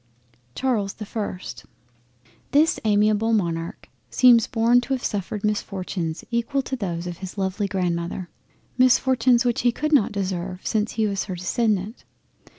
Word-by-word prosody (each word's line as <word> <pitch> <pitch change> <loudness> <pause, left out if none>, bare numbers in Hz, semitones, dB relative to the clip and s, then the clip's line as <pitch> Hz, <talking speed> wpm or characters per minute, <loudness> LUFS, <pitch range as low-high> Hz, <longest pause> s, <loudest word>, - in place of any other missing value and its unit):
CHARLES 220 -7 0
the 215 - -8
1st 200 -4 -6 0.9
This 305 +3 +4
amiable 215 +1 +2
Monarch 170 -5 -2 0.2
seems 240 -3 +5
born 235 +1 +3
to 265 +2 -3
have 255 - -7
suffered 205 0 -3
misfortunes 185 -5 -3
equal 235 +4 0
to 265 - -3
those 175 -7 -4
of 175 -1 -6
his 190 +1 -8
lovely 195 +1 -1
Grandmother; 175 -2 -2 0.5
misfortunes 255 -1 +4
which 240 -1 +1
he 240 - +3
could 305 +6 -2
not 270 -9 +4
deserve 185 -2 -4
since 215 0 0
he 220 -1 +1
was 200 -2 -1
her 190 - -5
descendant. 205 +3 -1
210 Hz, 145 wpm, -23 LUFS, 185-235 Hz, 0.9 s, seems